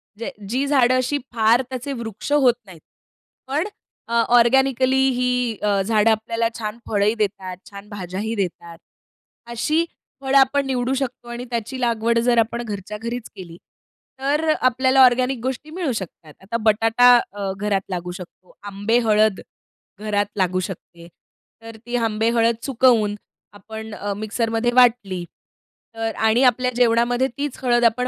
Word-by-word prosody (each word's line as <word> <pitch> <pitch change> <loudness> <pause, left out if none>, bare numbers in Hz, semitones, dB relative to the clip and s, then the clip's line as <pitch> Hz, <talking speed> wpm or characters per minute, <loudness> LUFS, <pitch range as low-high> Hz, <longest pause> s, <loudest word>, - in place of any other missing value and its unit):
म्हणजे 230 +6 -6 0.2
जी 260 +4 0
झाडं 255 -3 +3
अशी 255 +3 0 0.2
फार 230 +2 +3
त्याचे 260 +2 -5
वृक्ष 225 +4 -6
होत 265 -5 +5
नाहीत. 175 -4 -14 0.7
पण 300 +8 -1 0.4
अ, 235 - -6 0.2
ऑर्गेनिकली 260 +2 +3
ही 250 -2 0
अ, 200 -2 +1
झाडं 215 +2 +3
आपल्याला 230 +1 -1
छान 215 +1 -4
फळंही 205 +1 +2
देतात, 195 -4 -3
छान 200 0 -11
भाज्याही 205 +2 -5
देतात. 170 -3 -4 0.7
अशी 305 +8 0 0.4
फळं 270 0 -1
आपण 275 +1 +3
निवडू 255 0 -1
शकतो 255 -2 -4
आणि 240 +1 -6
त्याची 240 +2 -4
लागवड 230 0 +1
जर 245 -1 +3
आपण 230 +1 0
घरच्या 210 -1 -6
घरीच 235 +1 -6
केली, 170 -3 -10 0.6
तर 295 +4 0
आपल्याला 260 +1 +2
ऑर्गेनिक 255 +1 +3
गोष्टी 260 +4 -4
मिळू 340 -6 -2
शकतात. 170 -7 -7
आता 210 +5 -3
बटाटा 225 +3 +4 0.2
अ, 200 -1 -4
घरात 205 -2 0
लागू 180 -1 -4
शकतो, 180 0 -12
आंबे 205 +3 0
हळद 215 -3 +2 0.6
घरात 205 -1 0
लागू 185 -1 +1
शकते. 170 -2 -11 0.5
तर 225 0 -10
ती 240 0 -4
आंबे 225 -1 0
हळद 230 0 +3
सुकवून 235 -5 +3 0.4
आपण 220 +2 -9
अ, 205 -1 -4
मिक्सरमध्ये 225 +2 -1
वाटली. 225 -8 +3 0.7
तर 225 0 -3
आणि 220 +4 +2
आपल्या 250 0 +3
जेवणामध्ये 245 +1 +2
तीच 285 -2 -3
हळद 240 -1 +2
आपण 250 +2 +2
230 Hz, 145 wpm, -21 LUFS, 210-250 Hz, 0.7 s, होत